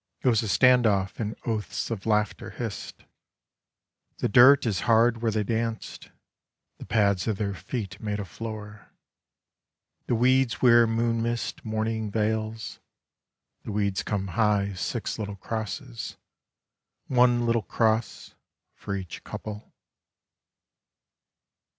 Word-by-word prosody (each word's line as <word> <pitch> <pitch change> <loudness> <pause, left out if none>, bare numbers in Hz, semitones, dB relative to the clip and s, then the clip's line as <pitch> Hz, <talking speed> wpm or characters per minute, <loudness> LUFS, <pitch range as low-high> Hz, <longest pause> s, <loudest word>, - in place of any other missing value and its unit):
It - - +1
was 115 -3 +3
a 110 - -3
stand 125 +5 +5
off 100 -2 0
in 110 0 -3
oaths 110 0 -3
of 110 -2 -4
laughter 105 -3 0
hissed; 115 -4 -7 1.1
The - - 0
dirt 130 +6 +7
is 105 -5 0
hard 115 0 +4
where 115 - +1
they 105 0 0
danced. 115 +1 -3 0.7
The - - -9
pads 100 -3 +2
of 110 -3 0
their 100 -1 -2
feet 105 +1 -5
made 105 -2 -2
a 100 - -4
floor. 105 +1 -8 1.2
The 120 - +1
weeds 130 +1 +3
wear 120 -2 +6
moon 115 0 0
mist 115 -1 -3
mourning 110 0 -2
veils. 110 +1 -2 0.8
The - - -7
weeds 100 -2 0
come 100 -2 -3
high 105 0 +2
as 95 -3 -7
six - - -3
little 105 -1 -4
crosses, 100 - -5 0.9
One 125 -2 +3
little 115 -1 +2
cross 110 +2 -1 0.4
for 100 - -5
each 95 -3 -7
couple. 105 0 -8
110 Hz, 125 wpm, -26 LUFS, 105-115 Hz, 1.2 s, dirt